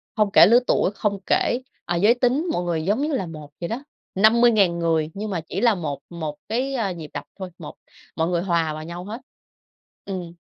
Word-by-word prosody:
không 210 -3 +2
kể - - +8
lứa 235 +3 +6
tuổi, 190 - +2
không 200 -2 -1
kể, 245 - +1 0.2
ờ, 175 - -1
giới 205 +7 +5
tính, 255 +7 +1
mọi 175 - -1
người 170 -2 -1
giống 210 +7 +1
như 300 +1 -1
là 225 -9 -1
một 155 -3 -9
vậy 170 - -2
đó. 240 +5 -4 0.3
50.000 215 -4 +4
người 160 -2 +1
nhưng 210 +2 -5
mà 175 -4 -2
chỉ 195 - -3
là 235 -3 +4
một 150 -6 -4
một 160 -4 -5
cái, 260 +4 -1
a, 215 -7 -1
nhịp 160 -4 -8
đập - - -4 0.2
thôi, 190 -1 -5
một 155 -4 -9 0.4
mọi 160 0 0
người 175 -1 0
hòa 170 -4 0
vào 155 - -6
nhau 170 +2 -7
hết. 225 +5 -7 0.8
Ừm. 180 -4 -5
190 Hz, 220 wpm, -23 LUFS, 170-225 Hz, 0.8 s, kể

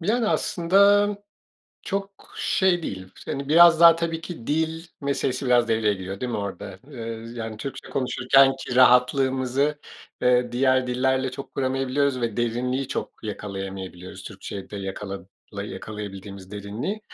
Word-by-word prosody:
Yani, 220 +6 +1
aslında 200 +3 +4 0.7
çok 195 0 -5
şey 185 -2 +2
değil. 95 -9 -5 0.2
Hani, 140 0 -4
biraz 170 +1 +7
daha 170 -1 +9
tabii 165 -1 -2
ki 160 -9 -8
dil 160 +2 -1 0.2
meselesi 140 -2 -1
biraz 120 -1 +4
devreye 110 -2 +2
giriyor, 95 +1 -7
değil 125 -1 -3
mi - - -1
orada? 100 -1 -6
Iıı, 115 -3 -7
yani, 110 -1 -5
Türkçe 135 +4 -7
konuşurkenki 135 0 +2
rahatlığımızı, 130 +2 +3 0.4
eee, 125 -1 +3
diğer 130 0 +2
dillerle 130 +1 +1
çok 130 +2 -9
kuramayabiliyoruz 135 0 0
ve 115 -2 -2
derinliği 125 +3 -1
çok - - -5
yakalayamayabiliyoruz 95 -3 -6
Türkçe'de 100 +1 -8
yakala 95 0 -6 0.4
yakalayabildiğimiz 100 -2 -8
derinliği. 105 - -4
125 Hz, 125 wpm, -24 LUFS, 105-145 Hz, 0.7 s, daha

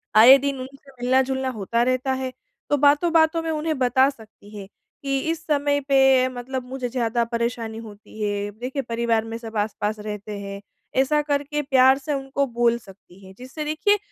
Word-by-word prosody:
आए 245 +5 +9
दिन 275 0 -3
उनसे 275 +2 -11
मिलना-जुलना 260 +1 +1
होता 230 +4 0
रहता 255 +1 0
है, 260 0 -3 0.4
तो 290 - +3
बातों-बातों 320 +3 +3
में 325 - -3
उन्हें 310 0 -2
बता 260 +1 +4
सकती 220 -5 -14
हैं 195 -1 -8 0.4
कि, 275 -1 0
"इस 330 0 -6
समय 285 -1 +1
पे 265 -1 +5
मतलब 255 +1 -5
मुझे 255 -1 -4
ज़्यादा 235 -1 0
परेशानी 235 -1 -3
होती 215 -1 -11
है। 205 0 -2
देखिए, 260 +3 -3
परिवार 230 -2 0
में 225 0 -5
सब 225 -1 -7
आस-पास 210 0 -2
रहते 210 0 -6
हैं।" 200 0 -7 0.4
ऐसा 295 +3 +2
करके 290 0 -1
प्यार 265 -2 +4
से 280 +2 -4
उनको 275 0 -1
बोल 235 -1 +1
सकती 195 -3 -17
हैं, 190 - -13
जिससे 260 +5 -7
देखिए, 310 +8 +2
255 Hz, 175 wpm, -23 LUFS, 225-280 Hz, 0.4 s, आए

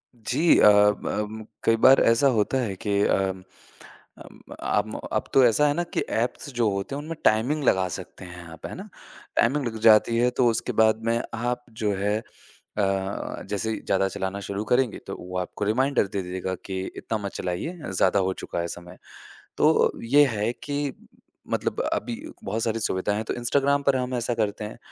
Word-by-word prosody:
जी, 125 +8 +2
अब 105 0 +5
अम, 105 +1 -3 0.2
कई 115 - +4
बार 135 +1 +8
ऐसा 115 +4 +4
होता 105 +5 +1
है 100 -5 -3
कि 100 -1 +1
अ, - - +3 1.0
अम, - - -14 0.2
आम - - 0 0.2
अब - - -1
तो 135 - +6
ऐसा 135 +6 +4
है 145 - +2
ना 175 - -1
कि - - +2
ऐप्स 120 +5 -2
जो 115 -3 +2
होते 100 +8 -3
हैं, 145 - -4
उनमें 160 +2 -6
टाइमिंग 125 +8 +2
लगा 95 -7 +3
सकते - - -11
हैं 90 -1 -10
आप, 80 - -11
है - - -6
ना? - - -9 0.5
टाइमिंग 135 +4 +2
लग 110 -1 -5
जाती 110 +1 +5
है, 120 +1 +3
तो 125 0 +2
उसके 115 +2 -1
बाद 110 0 +3
में 115 0 +2 0.2
आप, 120 +1 -2
जो 110 -2 -1
है 105 +2 0 0.6
अ, 95 -1 -2
जैसे 105 +2 -2
ही - - -3
ज़्यादा 95 0 +1
चलाना 95 +1 -4
शुरू 100 +1 -4
करेंगे, 125 -2 +2
तो - - -5
वो 90 +1 -6
आपको 90 +3 -4
रिमाइंडर 130 +1 +2
दे 100 - 0
देगा 95 +1 -4
कि 95 -1 -3 0.2
इतना 110 - -3
मत 100 - -3
चलाइए, 90 - -3 0.2
ज़्यादा 95 +1 +2
हो 95 - +1
चुका - - -5
है 85 - -1
समय। 90 +1 -9 0.6
तो - - +4
ये 145 +5 +5
है 110 -2 -1
कि 145 -1 -2 0.6
मतलब - - -1
अभी 115 +2 -2 0.3
बहुत 110 +3 -2
सारी 115 0 -1
सुविधाएँ 100 -1 -1
हैं, 110 - -3
तो - - -2
इंस्टाग्राम 140 +3 +1
पर 140 -1 +3
हम 125 0 -3
ऐसा 120 0 -1
करते 105 -1 -1
हैं। 105 - -8
110 Hz, 195 wpm, -25 LUFS, 100-125 Hz, 1.0 s, बार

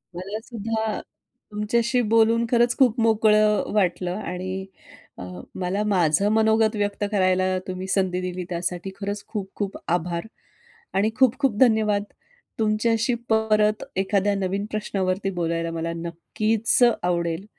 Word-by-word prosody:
मला 195 +4 -5
सुद्धा 220 -2 -3 0.5
तुमच्याशी 235 +4 +1
बोलून 230 +1 +4
खरंच 240 0 +3
खूप 250 -3 +3
मोकळं 215 -1 +4
अ, - - -7
वाटलं 180 -3 0
आणि 185 0 -4 0.5
अ, - - -7 0.4
मला 190 +3 -1
माझं 190 -1 +2
मनोगत 220 0 +3
व्यक्त 205 0 -2
करायला 185 -1 +2
तुम्ही 185 0 -5
संधी 185 -1 0
दिली 180 0 -4
त्यासाठी 175 +2 -3
खरंच 200 0 -4
खूप-खूप 200 -1 -5
आभार 170 +1 -1 0.7
आणि 210 +3 +3
खूप-खूप 260 -1 +2
धन्यवाद. 220 -4 +3 0.6
तुमच्याशी 225 +2 +1 0.2
परत 215 -1 +2
एखाद्या 200 +1 +1
नवीन 195 +1 -2
प्रश्नावरती 195 -2 -1
बोलायला 165 -2 -2
मला 165 0 -3
नक्कीच 215 +8 0 0.2
आवडेल. 170 +1 -1
205 Hz, 120 wpm, -24 LUFS, 185-220 Hz, 0.7 s, बोलून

